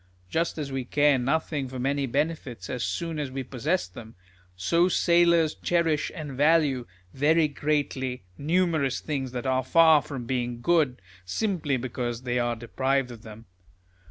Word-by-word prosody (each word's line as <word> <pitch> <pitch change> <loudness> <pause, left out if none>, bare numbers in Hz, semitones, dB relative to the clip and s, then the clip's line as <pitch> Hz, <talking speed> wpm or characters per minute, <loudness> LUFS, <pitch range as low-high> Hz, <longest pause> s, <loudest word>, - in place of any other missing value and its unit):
Just 165 +1 0
as 145 -3 -4
we 135 -1 -2
care 145 +1 +3
nothing 140 +1 -1
for 130 0 -7
many 135 +2 0
benefits 135 - -2
as 125 -2 -3
soon 165 -2 -3
as 145 -3 -2
we 135 +1 -4
possess 140 - -1
them; 110 +5 -12 0.4
so 170 - +2
sailors 170 -3 +3
cherish 165 -4 0
and 155 -4 -6
value, 145 -2 +2 0.3
very 155 +3 +3
greatly, 140 -4 -2
numerous 160 - +1
things 135 -4 -3
that 125 +1 -5
are 130 0 +1
far 160 +2 +6
from 135 -5 -7
being 120 -1 -2
good, 145 -3 +2 0.2
simply 150 - -1
because 120 -1 -4
they 125 -1 0
are 120 -1 0
deprived 130 +3 -1
of 115 -2 -10
them. 110 0 -12
135 Hz, 155 wpm, -26 LUFS, 125-160 Hz, 0.4 s, far